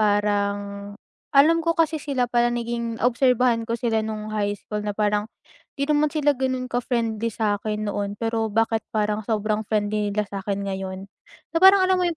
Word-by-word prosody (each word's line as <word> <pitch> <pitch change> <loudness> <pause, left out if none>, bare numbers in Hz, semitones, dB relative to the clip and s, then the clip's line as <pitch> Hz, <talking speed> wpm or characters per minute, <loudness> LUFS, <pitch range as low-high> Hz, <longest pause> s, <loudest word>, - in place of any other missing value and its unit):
parang 205 -1 0 0.4
alam 315 +4 +5
ko 335 0 0
kasi 320 -1 +2
sila 265 -4 0
pala, 240 0 +2
naging 235 -1 -3
obserbahan 250 -1 +3
ko 230 - 0
sila 225 -2 +1
noong 215 0 -5
high 205 -1 0
school 210 +1 -5
na 210 - -2
parang 210 0 0 0.5
hindi 280 - +1
naman 300 +1 +3
sila 295 -2 +2
gano'n 260 -1 -2
ka-friendly 230 -2 -1
sa'kin 210 0 -2
noon, 205 0 -3
pero 225 -1 -1
bakit 225 +1 +1
parang 210 0 0
sobrang 215 0 -1
friendly 210 -1 0
nila 210 +1 0
sa'kin 200 0 -4
ngayon? 190 0 -5 0.5
Na - - 0
parang, 380 0 +8
alam 370 0 +2
mo - - +1
'yung 335 - -3
220 Hz, 175 wpm, -23 LUFS, 205-250 Hz, 0.5 s, parang